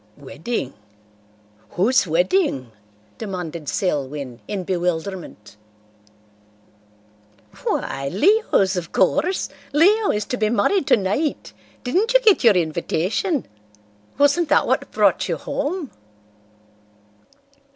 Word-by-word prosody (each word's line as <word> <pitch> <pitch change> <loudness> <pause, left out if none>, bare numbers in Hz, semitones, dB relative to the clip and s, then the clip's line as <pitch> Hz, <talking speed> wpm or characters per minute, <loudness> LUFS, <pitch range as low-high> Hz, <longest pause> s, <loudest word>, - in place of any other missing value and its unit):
"Wedding? 145 - -5 1.0
Whose 220 +3 +3
wedding?" 170 - +1 0.5
demanded 175 -7 -5
Selwyn, 140 -7 -3
in 195 -3 -3
bewilderment. 175 - -4 2.1
"Why, 135 0 -2
Leo's, 215 - +3
of 175 -2 -4
course. 355 - +1 0.3
Leo 400 +8 +4
is 210 0 0
to 250 - -3
be 215 -2 +1
married 250 - +1
tonight. 215 +10 0 0.3
Didn't 395 - 0
you - - +8
get 430 - +4
your 225 -4 +6
invitation? 180 - -1 0.7
Wasn't 285 +3 +3
that - - +4
what - - 0
brought - - +2
you - - -1
home?" 295 +1 -4
200 Hz, 95 wpm, -21 LUFS, -, 2.1 s, you